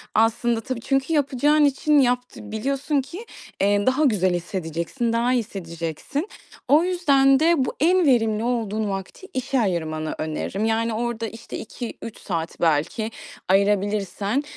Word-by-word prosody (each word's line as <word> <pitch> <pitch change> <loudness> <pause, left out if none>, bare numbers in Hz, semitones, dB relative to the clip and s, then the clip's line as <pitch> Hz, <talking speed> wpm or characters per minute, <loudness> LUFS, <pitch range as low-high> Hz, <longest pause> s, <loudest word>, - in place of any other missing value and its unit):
aslında 225 +1 +2
tabii 255 -1 -4
çünkü 270 +5 0
yapacağın 295 +1 +3
için 290 +2 +3
yapt 250 -1 +1
biliyorsun 275 +7 -1
ki, 340 - -9 0.4
eee, 205 +1 +2
daha 260 +4 +2
güzel 190 -8 +2
hissedeceksin, 175 - -2
daha 235 +2 +2
iyi - - +3
hissedeceksin. 170 - -4 0.4
O 300 +4 +5
yüzden 280 -7 +4
de 320 -3 +3
bu - - -3
en 355 +3 +4
verimli 225 -5 +2
olduğun 220 -3 -1
vakti 195 - -6
işe 260 0 0
ayırmanı 160 -6 -2
öneririm. 160 +6 -3
Yani, 225 +1 +1
orada, 230 0 -2
işte, 225 +2 -8
2-3 230 -1 -7
saat 165 -4 -4
belki 165 +8 +1 0.4
ayırabilirsen, 200 +4 +1
230 Hz, 135 wpm, -23 LUFS, 200-270 Hz, 0.4 s, O